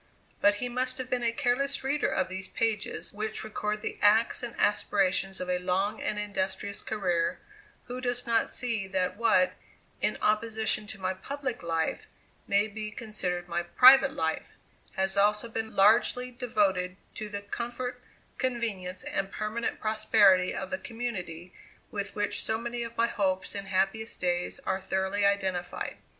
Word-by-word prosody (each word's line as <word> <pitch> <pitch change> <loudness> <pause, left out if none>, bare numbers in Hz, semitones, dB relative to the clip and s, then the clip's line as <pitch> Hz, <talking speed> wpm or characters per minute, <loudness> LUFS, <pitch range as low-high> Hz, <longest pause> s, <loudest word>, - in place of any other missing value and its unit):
But 205 0 +5
he 245 +4 -2
must 255 +1 -1
have 255 -1 -6
been 250 -1 +1
a 235 -1 +2
careless 275 +3 0
reader 285 +2 +1
of 185 - +1
these 190 +1 -5
pages, 220 -2 -2
which 215 +1 -3
record 210 -1 -3
the - - -4
acts 215 +3 +4
and 240 -1 -5
aspirations 195 -2 +2
of 185 - -4
a 180 0 0
long 190 +4 0
and 210 - -1
industrious 200 -1 -3
career, 180 -6 0 0.5
who 250 +1 -6
does 245 -1 -1
not 230 -1 +2
see 230 -6 -2
that 185 -1 0
what, 235 +5 +3 0.5
in - - +1
opposition 215 0 0
to 205 -1 -7
my 185 0 -1
"public 265 +6 -4
life," 165 -1 -1 0.4
may 200 +1 +3
be 215 0 -5
considered 195 -6 -3
my 170 0 -1
"private 260 +9 +7
life," 160 0 -2 0.4
has 190 0 +1
also 210 +3 +3
been 220 -1 -4
largely 225 +5 +4
devoted 200 -7 0 0.2
to 215 -1 -6
the 200 -1 -4
comfort, 240 +4 -4 0.4
convenience, 215 -8 -2
and 195 0 -2
permanent 215 +2 -2
prosperity 210 -4 +4
of - - -4
the 280 - -1
community 185 -8 -5 0.4
with 200 -1 -4
which 205 -1 -1
so 220 - 0
many 235 +1 -4
of 235 0 -5
my 230 - +4
hopes 190 -4 -1
and 200 -1 -5
happiest 195 +4 0
days 175 -1 -1
are 190 - -1
thoroughly 190 +1 -1
identified. 190 -3 -1
210 Hz, 160 wpm, -29 LUFS, 190-235 Hz, 0.5 s, private